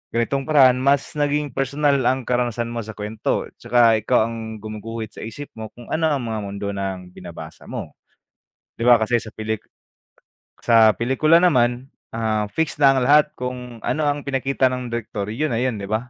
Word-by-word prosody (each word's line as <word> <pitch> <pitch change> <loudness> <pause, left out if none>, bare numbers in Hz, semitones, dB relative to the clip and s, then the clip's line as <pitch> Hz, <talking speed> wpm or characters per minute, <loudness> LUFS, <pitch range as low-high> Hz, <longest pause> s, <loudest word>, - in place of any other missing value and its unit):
ganitong 135 +4 0
paraan 130 -5 +5
mas 140 +1 +2
naging 145 0 0
personal 140 +1 +1
ang 130 0 +1
karanasan 120 -1 -1
mo 120 - -4
sa 110 0 -9
kuwento. 105 +1 -2 0.2
Tsaka 115 -2 +4
ikaw 110 +1 +2
ang 110 -1 -6
gumuguhit 110 +1 -6
sa - - -9
isip 140 +6 -8
mo 110 -1 -6
kung 120 -1 -13
ano 160 0 +2
ang 140 -4 -1
mga 110 -1 -3
mundo 100 0 -5
ng 95 -2 -5
binabasa - - -10
mo, - - -7 0.8
di 115 - -2
ba, 120 -1 +8
kasi 120 +2 +2
sa 110 - -9
pelik 110 0 -3 1.0
sa 115 -2 +5
pelikula 155 +8 +3
naman, 125 -6 +2 0.2
ah, 110 -2 0
fix 160 -1 -1
na 140 -2 +6
ang 135 - +1
lahat 150 +3 +4
kung 125 -2 -6
ano 140 +6 -1
ang 145 0 0
pinakita 135 -1 +1
ng 125 -2 -5
direktor, 105 -3 -4
yun 150 +7 -1
na 115 - 0
yun, 125 -4 -1
di 100 - -6
ba? 110 - +2
120 Hz, 185 wpm, -22 LUFS, 110-135 Hz, 1.0 s, ba